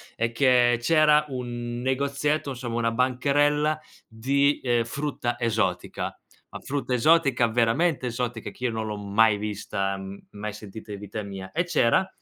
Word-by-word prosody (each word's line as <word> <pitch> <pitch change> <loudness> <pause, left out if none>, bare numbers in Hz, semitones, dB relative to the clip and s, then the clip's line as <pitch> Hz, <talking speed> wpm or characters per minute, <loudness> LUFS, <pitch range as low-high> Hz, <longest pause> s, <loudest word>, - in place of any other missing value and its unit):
è 115 0 -1
che 120 -1 +4
c'era 150 +2 +4
un 120 -2 -5
negozietto, 140 +3 0
insomma 120 -2 -4
una 115 -1 +1
bancarella 145 +5 +2 0.3
di, 140 +6 +1
ehm, 120 -2 +2
frutta 120 -1 -3
esotica. 105 -6 -1 0.3
La - - -8
frutta 135 -3 -3
esotica 135 -2 +4
veramente 125 +6 +1
esotica, 120 -1 -3
che - - -13
io 120 - +1
non 110 -1 -3
l'ho 105 -1 -4
mai 105 +1 +3
vista, 100 -2 -3
m 95 +1 -8
mai 105 +1 -5
sentita 105 +1 -10
in 100 - -7
vita 105 +1 -6
mia. 95 -1 -8
E 170 - 0
c'era 170 +1 +2
120 Hz, 150 wpm, -25 LUFS, 110-140 Hz, 0.3 s, che